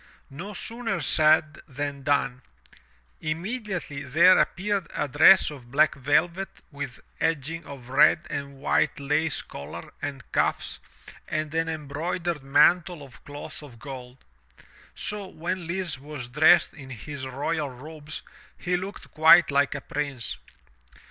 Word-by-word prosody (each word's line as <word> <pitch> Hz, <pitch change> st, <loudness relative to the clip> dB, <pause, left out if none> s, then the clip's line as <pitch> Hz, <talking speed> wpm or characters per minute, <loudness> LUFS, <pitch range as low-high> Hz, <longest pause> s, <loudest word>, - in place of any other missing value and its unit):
No 190 Hz, +9 st, -7 dB
sooner 230 Hz, +4 st, -3 dB
said 155 Hz, -1 st, +3 dB
than 140 Hz, 0 st, -4 dB
done; 130 Hz, -2 st, 0 dB, 0.8 s
immediately 175 Hz, -, -4 dB
there 160 Hz, +7 st, +5 dB
appeared 200 Hz, 0 st, 0 dB
a -, -, 0 dB
dress 155 Hz, +6 st, +6 dB
of 130 Hz, -5 st, -11 dB
black 150 Hz, +4 st, +4 dB
velvet 170 Hz, +8 st, +1 dB, 0.2 s
with 140 Hz, -3 st, -6 dB, 0.2 s
edging 165 Hz, +1 st, -1 dB
of 130 Hz, -4 st, -10 dB
red 135 Hz, +2 st, +5 dB
and 140 Hz, -1 st, -5 dB
with 140 Hz, -, +1 dB
lace 150 Hz, +2 st, 0 dB
collar 75 Hz, +4 st, -9 dB
and 140 Hz, -2 st, -5 dB
cuffs -, -, 0 dB, 0.5 s
and 155 Hz, 0 st, -2 dB
an 165 Hz, 0 st, 0 dB
embroidered 160 Hz, +2 st, -3 dB
mantle 170 Hz, +4 st, +3 dB
of 135 Hz, -3 st, -15 dB
cloth 145 Hz, +2 st, -9 dB
of 135 Hz, -6 st, -12 dB
gold. 125 Hz, 0 st, -9 dB, 0.8 s
So 205 Hz, -1 st, -3 dB
when 175 Hz, +1 st, -4 dB
Lise 175 Hz, -5 st, -2 dB
was 145 Hz, -3 st, -7 dB
dressed 150 Hz, +5 st, +5 dB
in 135 Hz, -4 st, -11 dB
his 130 Hz, +2 st, -6 dB
royal 145 Hz, +3 st, -2 dB
robes 150 Hz, +4 st, -8 dB, 0.3 s
he 180 Hz, 0 st, -1 dB
looked 190 Hz, +3 st, -7 dB
quite 160 Hz, +1 st, +7 dB
like 140 Hz, +1 st, +2 dB
a 140 Hz, -, -4 dB
prince. 140 Hz, -5 st, -4 dB
150 Hz, 130 wpm, -26 LUFS, 140-170 Hz, 0.8 s, quite